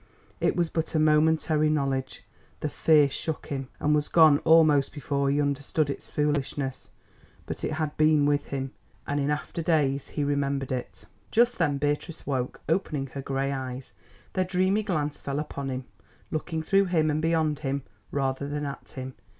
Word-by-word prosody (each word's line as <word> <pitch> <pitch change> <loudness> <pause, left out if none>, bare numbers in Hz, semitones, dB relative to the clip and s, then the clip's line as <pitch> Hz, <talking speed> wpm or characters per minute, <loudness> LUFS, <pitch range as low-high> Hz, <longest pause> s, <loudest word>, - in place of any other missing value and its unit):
It - - +1
was 170 -2 0
but 160 0 -2
a - - +4
momentary 155 0 +3
knowledge; 135 -3 -1 0.4
the 150 - -1
fear 150 -1 +4
shook 155 +3 -4
him, 135 -2 -3
and 150 - +2
was 150 0 +1
gone 155 -3 +6
almost 155 -4 +5
before 140 -1 0
he 140 +1 +2
understood 145 +1 0
its - - -8
foolishness. 145 -2 -1 0.6
But - - -6
it - - -1
had 155 -1 -2
been 155 -1 +4
with 145 0 +1
him, 135 -1 -3 0.3
and 145 0 -1
in 140 +1 0
after 150 +3 -2
days 145 -4 +1
he 150 - -2
remembered 140 -1 -1
it. 125 -1 -5 0.2
Just 240 +1 +3
then 145 -1 +2
Beatrice 145 +3 -2
woke, 130 -3 -2
opening 150 -5 -1
her 140 - -4
grey 135 0 -1
eyes. 130 -1 -5 0.4
Their 185 - +2
dreamy 185 +3 +2
glance 155 -8 -2
fell 140 0 -3
upon 140 -2 -4
him, 130 0 -4 0.5
looking 160 +1 -2
through 195 +4 +3
him 160 -4 +2
and 150 +1 0
beyond 160 -2 +1
him, 140 -2 -2 0.3
rather 135 0 -1
than 145 0 -3
at 140 -1 -7
him. 130 0 -6
145 Hz, 175 wpm, -27 LUFS, 140-155 Hz, 0.6 s, gone